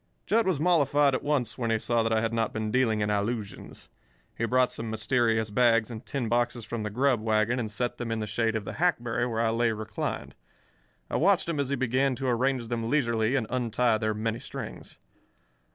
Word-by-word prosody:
Jud 225 -2 +2
was 180 -7 +1
mollified 145 -4 +3
at 130 - 0
once 140 -5 -1
when 115 -2 -1
he 115 - +2
saw 115 +1 0
that 115 0 0
I 110 0 +2
had 115 0 -1
not 115 -2 0
been 110 -1 -3
dealing 115 -3 +2
in 105 0 0
allusions. 105 0 -4 0.5
He 115 - -1
brought 125 +2 +2
some 115 0 -5
mysterious 110 -1 +1
bags 115 0 +3
and 110 -1 -7
tin 135 -5 -3
boxes 120 0 0
from 120 -1 -4
the 105 - -3
grub 125 +2 +1
wagon 110 +2 +1
and 110 -3 -2
set 120 +4 -2
them 120 -2 -3
in 115 - -1
the 110 - -2
shade 110 +2 0
of 110 -2 -3
the - - -5
hackberry 120 -9 +1
where 115 -2 -1
I 115 -1 +2
lay 115 0 +2
reclined. 110 0 -4 0.7
I - - -1
watched 190 +2 +3
him 165 -3 -2
as 140 -2 0
he 140 - +1
began 130 +1 +1
to 135 +2 -5
arrange 125 0 0
them 115 -1 -2
leisurely 115 -4 +1
and 130 -4 +1
untie 120 -2 +1
their 110 -1 -1
many 110 +2 -2
strings. - - -8
115 Hz, 215 wpm, -27 LUFS, 110-130 Hz, 0.7 s, mollified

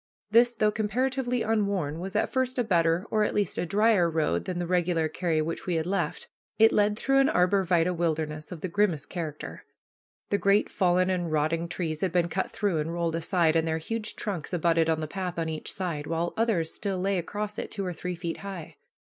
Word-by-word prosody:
This, 240 +2 +5
though 215 -1 +2
comparatively 250 +3 0
unworn, 200 -8 0
was 190 +2 -6
at - - +1
first 260 -1 0
a 245 - +2
better, 170 -2 +2
or, 215 -1 +3
at - - -1
least, 205 -1 0
a 175 - -1
dryer 205 -2 +3
road 155 - 0
than 180 - -3
the 175 - -1
regular 175 -2 +1
carry 160 -1 0
which 165 +4 -5
we 175 - +1
had 160 -1 0
left. 180 -4 -2 0.3
It 225 0 +6
led 210 0 +2
through 270 +3 +2
an 275 - +4
arbor 180 +2 +3
vitæ 175 0 +2
wilderness 155 -2 -2
of 170 -4 -7
the - - -2
grimmest 180 -5 0
character. 160 -4 -6 0.7
The 200 - +2
great 200 +1 +3
fallen 185 0 +2
and 175 -3 -1
rotting 155 +2 0
trees 160 -3 -3
had 190 - +1
been 175 -1 +2
cut 190 +3 -1
through 200 -7 -1
and 155 +2 -2
rolled 170 -1 -1
aside, 165 -1 +2
and 165 0 +2
their 160 0 0
huge 220 +7 -4
trunks 190 -6 -4
abutted 165 -1 +2
on 160 -1 +1
the 155 - -3
path 180 +1 -4
on 165 -1 -1
each 155 -1 -4
side, 170 -7 -3
while 170 +1 -1
others 220 -8 0
still 195 -2 -3
lay 190 +1 0
across 210 +4 -4
it - - -4
two 195 - -3
or 180 - -3
three 180 +2 -4
feet 170 -1 -4
high. 195 -5 -8
180 Hz, 215 wpm, -27 LUFS, 165-205 Hz, 0.7 s, It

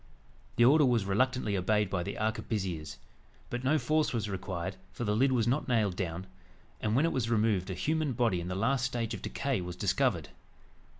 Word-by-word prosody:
The 120 - +5
order 150 +4 +6
was 120 -6 +2
reluctantly 110 +1 +1
obeyed 105 +1 +1
by 90 - 0
the 100 +3 -4
arquebusiers. 95 -7 -2 0.5
But 120 +1 -3
no 145 +4 +3
force 155 +3 +1
was 110 -3 -1
required, 95 -1 -4 0.2
for - - -5
the 105 -2 +1
lid 130 +4 +3
was 120 -3 +2
not 135 +6 +1
nailed 110 -7 +1
down; 90 -1 -3 0.6
and 110 0 0
when 140 +5 +4
it 165 - +1
was 120 -4 -1
removed, 105 -5 +1
a 95 - -3
human 155 - 0
body 115 -7 +1
in 85 - -5
the 90 - -3
last 125 +6 +1
stage 120 -2 -2
of 105 - -6
decay 135 -7 -2
was 90 0 -6
discovered. 100 - 0
110 Hz, 195 wpm, -30 LUFS, 95-130 Hz, 0.6 s, order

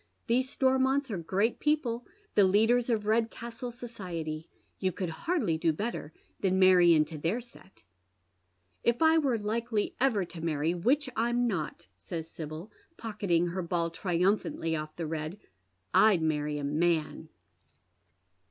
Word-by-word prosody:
•♦These 245 +3 +3
Stormonts 265 0 +2
are 200 - -2
great 195 +7 0
people, 250 -6 0 0.3
the 205 - +5
leaders 225 +6 +3
of 220 -3 0
Redcastle 230 +2 -1
society. 180 -10 -6 0.3
You 190 -1 +1
could 180 -1 -4
hardly 210 - -1
do 165 - +3
better 180 -3 -4 0.3
than 190 -1 +1
marry 180 -2 +6
into 155 0 0
their 170 +10 0
set." 235 -5 -16 0.5
" 90 +1 -45
If 240 +7 -2
I 320 0 +6
were 270 -6 +1
likely 220 +1 -1
ever 225 -8 +2
to 165 -1 -10
marry, 160 0 0
which 255 - +1
I'm 240 +2 +1
not," 180 - -3
says 160 - -6
Sibyl, 160 +5 -8 0.3
pocketing 195 -6 0
her 185 +2 -3
ball 170 -1 -1
triumphantly 180 -1 0
ofE 155 -1 -3
the 170 - -4
red, 155 +3 -4 0.3
" 90 0 -45
I'd 200 -7 +5
marry 150 -1 0
a 145 - -4
man." 155 +1 0
185 Hz, 145 wpm, -30 LUFS, 160-235 Hz, 0.5 s, marry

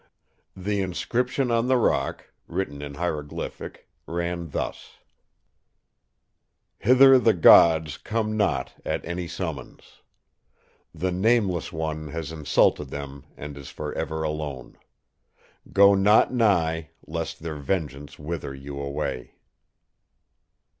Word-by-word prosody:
The 100 +2 -1
inscription 125 +7 -1
on 115 +1 +2
the 130 0 +4
rock, 120 - 0 0.2
written 70 -7 -4
in 70 -1 -7
hieroglyphic, 75 -3 -5 0.2
ran 85 0 -3
thus: - - -5 1.9
"'Hither 130 +3 +7
the 115 -3 +3
Gods 80 -3 +6
come 110 -1 -2
not 105 -1 0
at - - -3
any 85 0 -4
summons. - - -7 0.9
The 95 0 -2
"Nameless 95 -2 +1
One" 80 -1 -4
has 80 0 -5
insulted 75 -2 +1
them 70 0 -7
and 75 0 -7
is 70 -1 -9
for 75 -1 -6
ever 80 0 -3
alone. 75 -4 -5 1.0
Go 100 0 +7
not 105 +5 +4
nigh, 85 -9 +1 0.2
lest 80 0 -5
their 80 -2 -4
vengeance 75 -3 -3
wither 75 -2 -5
you 70 +1 -8
away! 70 -2 -4
80 Hz, 110 wpm, -25 LUFS, 75-100 Hz, 1.9 s, Hither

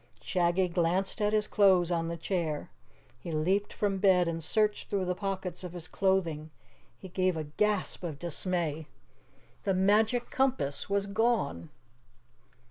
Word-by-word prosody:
Shaggy 180 0 +1
glanced 180 +4 0
at 210 0 +2
his 215 -1 +2
clothes 185 -4 +4
on 165 -1 0
the 170 0 -4
chair. 165 - -2 0.5
He 170 - -7
leaped 185 +6 0
from 200 -2 -1
bed 185 -3 +4
and 165 -1 -3
searched 210 +5 +1
through 195 -2 0
the 180 - 0
pockets 185 -2 -4
of 180 -1 -7
his 175 -2 -7
clothing. 170 -5 0 0.5
He 190 - -10
gave 185 -1 0
a 155 - -2
gasp 200 +7 -1
of 160 -5 -4
dismay. 165 -2 -2 0.7
The 195 -2 0
Magic 215 +5 +2
Compass 255 - 0
was 200 0 +1
gone! 200 - 0
185 Hz, 145 wpm, -30 LUFS, 165-200 Hz, 0.7 s, clothes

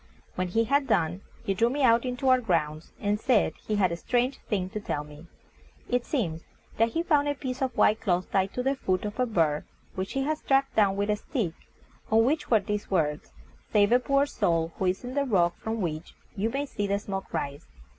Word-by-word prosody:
When 185 0 -2
he 225 +6 +2
had 275 +3 +1
done, 175 -5 +1 0.2
he 195 - 0
drew 230 +5 +2
me 280 +3 -1
out 235 0 +5
into 250 +1 -2
our 255 -1 +5
grounds 160 -7 -1
and 205 +1 0
said 245 -2 +2
he 215 - 0
had 190 -4 +2
a - - -1
strange 245 +9 0
thing 190 -4 0
to 215 - -3
tell 150 -7 -3
me. 150 +3 -13 0.6
It 245 0 0
seems 170 - -1 0.4
that 225 +1 +3
he 330 - 0
found 295 -4 +3
a 290 - 0
piece 260 -2 -5
of 260 -2 -1
white 215 +1 +4
cloth 180 -2 0
tied 195 0 +1
to 250 - -1
the 270 +1 +2
foot 190 -8 -1
of 210 +3 -5
a 250 - +2
bird 160 -8 +1 0.3
which 190 +1 -4
he 270 - 0
had 305 +2 -1
struck 270 0 +1
down 200 -3 +3
with 205 +1 0
a 210 - +1
stick, 210 - -2 0.6
on 225 +1 +4
which 300 +5 0
were 225 - +5
these 210 +1 -3
words: 150 -5 0 0.4
"Save 205 -1 +4
a 245 - +6
poor 275 +2 +2
soul, 165 - 0
who 190 - 0
is 185 +6 0
on 250 - -5
the 285 0 +1
rock 180 -9 +2
from 220 0 -3
which 160 -2 -4 0.2
you 210 +2 0
may 275 +4 -2
see 205 -7 -3
the 200 0 +1
smoke 195 -1 -5
rise." 140 0 -4
210 Hz, 225 wpm, -27 LUFS, 185-255 Hz, 0.6 s, a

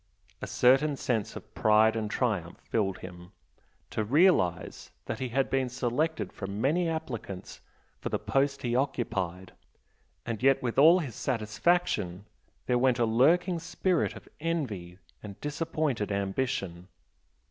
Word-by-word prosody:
A - - -4
certain 135 +4 +4
sense 115 -6 -2
of - - -10
pride 110 +1 +4
and 110 -2 -2
triumph 105 -8 -1
filled 100 -4 -1
him, 90 +1 -11 0.6
to 110 - -1
realise 125 - +2 0.2
that 110 - -4
he 130 - -3
had 135 +3 +1
been 135 -1 0
selected 130 +6 -1
from 100 +1 -5
many 165 +8 +1
applicants 125 - -6 0.4
for - - -4
the - - 0
post 140 0 0
he 120 -1 0
occupied 95 -9 -2 0.7
and 115 -2 -4
yet 135 +1 +4
with 120 +1 0
all 165 +5 +8
his 145 -10 -3
satisfaction 110 - 0 0.4
there 125 0 +2
went 125 -1 +3
a 120 - +2
lurking 165 - +3
spirit 180 +1 0
of - - -12
envy 120 - -3 0.2
and 100 -2 -9
disappointed 150 -7 -2
ambition. 95 -3 -2
120 Hz, 135 wpm, -29 LUFS, 100-145 Hz, 0.7 s, all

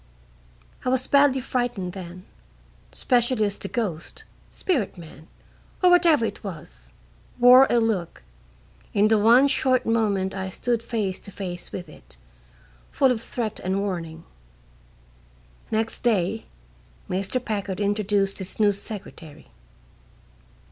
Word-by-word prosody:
I - - 0
was 260 0 +1
badly 280 -2 +4
frightened 240 -8 -2
then, 180 -1 -9 0.7
especially 240 -2 +1
as 205 0 -2
the - - -5
ghost, 190 -10 -4 0.3
spirit 260 - -2
man, 160 -2 -13 0.6
or 360 - +6
whatever 335 -8 +5
it - - -5
was, 60 - -10 0.5
wore 250 +2 +8
a 240 - +3
look, 195 - -1 0.7
in 210 +1 +4
the 220 -1 +4
one 235 +6 +6
short 255 -2 +1
moment 205 -4 0
I 190 -1 -4
stood 235 +4 -1
face 215 -5 -3
to 200 - -12
face 180 -3 -6
with 180 - -6
it, - - -16 0.7
full 265 -2 +3
of 230 -3 -2
threat 230 -2 -4
and 190 +1 -1
warning. 165 -5 -4 1.5
Next 225 0 -1
day 220 -2 0 0.6
Mr. 195 +7 -1
Packard 205 -5 -4
introduced 205 -1 0
his 190 +2 -6
new 210 -1 +5
secretary. 185 -7 -8
210 Hz, 125 wpm, -24 LUFS, 185-240 Hz, 1.5 s, wore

